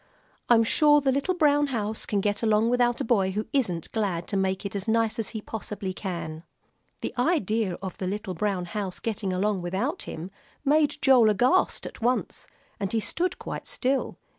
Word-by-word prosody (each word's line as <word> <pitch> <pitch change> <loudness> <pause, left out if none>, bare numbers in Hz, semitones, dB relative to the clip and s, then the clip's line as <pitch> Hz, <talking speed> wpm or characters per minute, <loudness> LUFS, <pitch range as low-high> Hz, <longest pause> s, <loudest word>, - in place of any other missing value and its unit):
I'm 230 -2 +6
sure 295 +6 +5
the 270 -2 +1
little 280 +7 0
brown 290 -3 +3
house 220 -4 -3
can 205 -2 0
get 205 0 0
along 220 +1 +3
without 245 -1 +2
a - - -1
boy 195 -5 +2
who 210 +2 -2
isn't 185 - 0
glad 190 -6 -1
to - - -2
make 190 0 0
it 200 - -4
as 200 +1 -3
nice 225 0 +1
as 220 - -1
he 220 -2 -6
possibly 205 -3 -5
can." 170 -5 -5 0.6
The - - -3
idea 225 - +1
of 190 - -5
the 185 - -2
little 200 0 -3
brown 185 0 -1
house 195 0 -4
getting 215 -4 -2
along 195 +1 0
without 195 - -2
him 170 +4 -6 0.3
made 295 +1 +3
Joel 250 -5 +6
aghast 245 - +2
at - - -9
once, 245 +2 -1 0.3
and 195 -1 -2
he 230 - +1
stood 345 - -1
quite - - -6
still. 265 +1 -1
215 Hz, 190 wpm, -26 LUFS, 190-250 Hz, 0.6 s, I'm